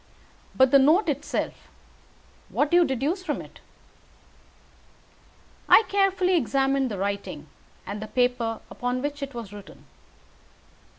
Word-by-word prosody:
But 260 -1 +4
the 275 - +7
note 315 +10 +4
itself - - -3 0.8
what 290 0 0
do 350 - +5
you 350 - +5
deduce 280 +7 -1
from - - -2
it?" - - -12 2.1
I - - +8
carefully 385 -2 +2
examined 270 -2 +1
the 205 - -5
writing, 200 +1 -4 0.4
and 205 +1 -6
the 215 - -6
paper 245 -2 0
upon 250 +1 -3
which 290 0 -4
it 275 -2 -6
was 225 -4 -7
written. 205 -1 -13
270 Hz, 125 wpm, -25 LUFS, 235-310 Hz, 2.1 s, I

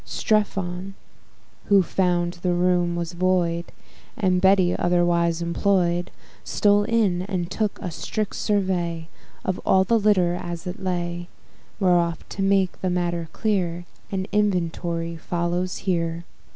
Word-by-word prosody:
Strephon, 195 -3 -1 0.7
who 200 -2 +5
found 175 0 0
the 180 -1 +1
room 175 -1 +2
was 170 0 -3
void, 175 -1 +1 0.5
And 185 -4 +2
Betty 190 -2 +4
otherwise 175 -1 +2
employ'd, 175 0 +1 0.3
Stole 205 0 +3
in, 210 -6 +2
and 185 -2 -3
took 215 -1 -1
a 180 - -4
strict 215 +5 -3
survey 175 -5 -1 0.4
Of 185 - -1
all 190 0 +4
the 230 +4 +2
litter 195 -5 +3
as 175 -1 -5
it 180 +1 -5
lay: 175 -1 -3 0.5
Whereof, 175 -3 +2
to 195 - -5
make 195 -1 +1
the 185 - 0
matter 175 -2 -1
clear, 175 -5 -1 0.3
An 190 -1 -1
inventory 170 -4 -1
follows 175 +2 -2
here. 170 -2 -1
180 Hz, 125 wpm, -24 LUFS, 170-195 Hz, 0.7 s, who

